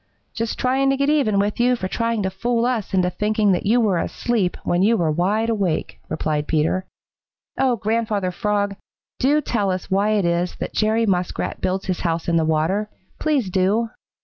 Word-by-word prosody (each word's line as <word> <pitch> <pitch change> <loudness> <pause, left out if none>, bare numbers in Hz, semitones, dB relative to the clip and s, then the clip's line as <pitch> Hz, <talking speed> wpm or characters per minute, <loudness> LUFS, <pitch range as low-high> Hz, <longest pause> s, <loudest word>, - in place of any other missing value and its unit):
"Just 230 -1 -3
trying 265 +2 +2
to 270 - +2
get 280 +2 +2
even 265 -10 +2
with 205 +2 0
you 250 +1 +4
for 190 -6 -3
trying 230 +1 -1
to 190 - -1
fool 235 +4 0
us 240 -5 -1
into 180 -1 +2
thinking 210 +2 +1
that 185 +2 0
you 235 +4 +4
were 200 -7 +2
asleep 210 -1 -1
when 175 +1 +1
you 225 +4 +4
were 165 -4 +1
wide 200 +8 +1
awake," 200 -8 -1
replied 150 -1 -1
Peter. 165 +4 0 0.7
"Oh, 260 -2 +3
Grandfather 215 -3 -1
Frog, 205 +1 -1 0.4
do 290 +4 +3
tell 210 -8 -1
us 185 +1 -3
why 200 +3 +2
it 205 -4 +1
is 170 +1 0
that - - -5
Jerry 220 +1 +2
Muskrat 180 -3 -1
builds 190 +1 -1
his 185 -2 -2
house 165 -1 -2
in 170 - +2
the 160 - +2
water. 165 +7 0 0.3
Please 275 -11 0
do!" 200 +5 +1
205 Hz, 190 wpm, -22 LUFS, 180-230 Hz, 0.7 s, you